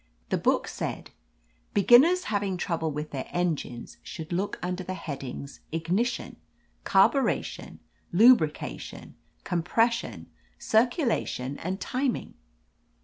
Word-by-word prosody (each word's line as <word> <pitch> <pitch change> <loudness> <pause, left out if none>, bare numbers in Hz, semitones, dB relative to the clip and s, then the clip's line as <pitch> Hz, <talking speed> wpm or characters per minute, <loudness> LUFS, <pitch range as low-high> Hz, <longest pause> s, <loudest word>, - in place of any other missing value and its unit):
The - - +1
book - - +2
said: - - -5 0.6
"Beginners 265 - +6
having 200 -3 -1
trouble 165 -3 -1
with 150 +1 -5
their 135 -2 -4
engines 160 -9 -3
should 160 +1 -7
look 190 +4 -1
under 180 +1 -2
the 185 +1 -4
headings 140 -4 -7
Ignition, 180 +10 -1 0.5
Carburation, 200 +8 +2 0.3
Lu 230 +8 +8
brication, 155 -7 -5 0.3
Compression; 225 +7 0 0.3
Circulation 225 - +1
and 185 +3 -3
Tim 255 +5 0
ing." - - -8
185 Hz, 105 wpm, -27 LUFS, 160-230 Hz, 0.6 s, Lu